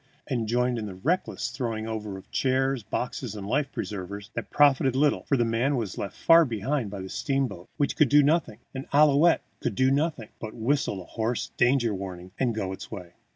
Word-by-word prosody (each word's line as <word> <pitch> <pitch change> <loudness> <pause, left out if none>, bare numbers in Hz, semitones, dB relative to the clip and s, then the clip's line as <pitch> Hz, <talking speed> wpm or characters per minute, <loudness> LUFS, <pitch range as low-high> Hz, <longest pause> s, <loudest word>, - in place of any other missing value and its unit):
and 120 -5 -2
joined 125 +1 +1
in 105 -2 -4
a 95 - -8
reckless 140 - -1
throwing 115 -3 -3
over 105 -3 -4
of 95 - -14
chairs, 135 0 +1
boxes, 125 +1 -4
and 100 -2 -6
life 135 +6 0
preservers 100 0 -6
that 115 - -5
profited 135 -3 +4
little, 145 +2 +2
for 140 - +2
the 120 - +2
man 120 +5 +1
was 110 -7 -3
left 100 - -5
far 165 0 +6
behind 125 -1 -2
by 100 0 -6
the 95 - -6
steamboat, 135 -5 -2
which 145 -3 0
could 150 -5 +4
do 145 0 +6
nothing 155 +2 +1 0.2
and 135 0 -6
Ouillette 150 +3 +5 0.2
could 105 - -2
do 130 +5 +3
nothing 140 -6 0
but 110 -1 -7
whistle 115 -5 0
a - - -17
hoarse 115 +1 -2
danger 120 -2 +3
warning 95 -2 -7
and 120 -4 +1
go 100 -4 -2
its - - -9
way. 90 -1 -8
120 Hz, 200 wpm, -27 LUFS, 105-140 Hz, 0.2 s, far